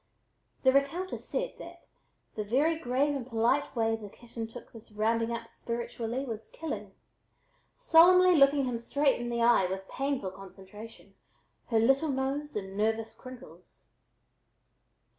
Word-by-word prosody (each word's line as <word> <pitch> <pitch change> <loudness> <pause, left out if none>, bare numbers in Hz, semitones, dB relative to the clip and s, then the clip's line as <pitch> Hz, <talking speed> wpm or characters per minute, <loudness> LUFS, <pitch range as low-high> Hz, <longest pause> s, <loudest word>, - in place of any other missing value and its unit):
The 260 -1 +5
recounter 320 +7 0
said - - -3
that 340 0 -12 0.5
the 215 - -3
very 290 +10 +1
grave 275 +2 0
and 270 - -3
polite 245 +4 +1
way 225 -1 +1
the 215 -2 -9
kitten 230 +1 -8
took 235 +2 -12
this 225 -1 -13
"rounding 225 +2 0
up 230 0 -4
spiritually" 235 +2 -4
was 225 -3 -6
killing, 320 -2 -6 0.8
solemnly 365 -4 +6
looking 275 -1 +5
him 245 -2 -2
straight 275 +2 +1
in 240 - -4
the 235 -1 0
eye 235 -6 +4
with 190 +1 -5
painful 270 -8 -2
concentration, 195 +3 -13 0.5
her 230 - +1
little 270 +7 +3
nose 275 +2 -2
in 195 -2 -5
nervous 220 +2 -1
crinkles. 255 0 -13
240 Hz, 140 wpm, -29 LUFS, 225-280 Hz, 0.8 s, solemnly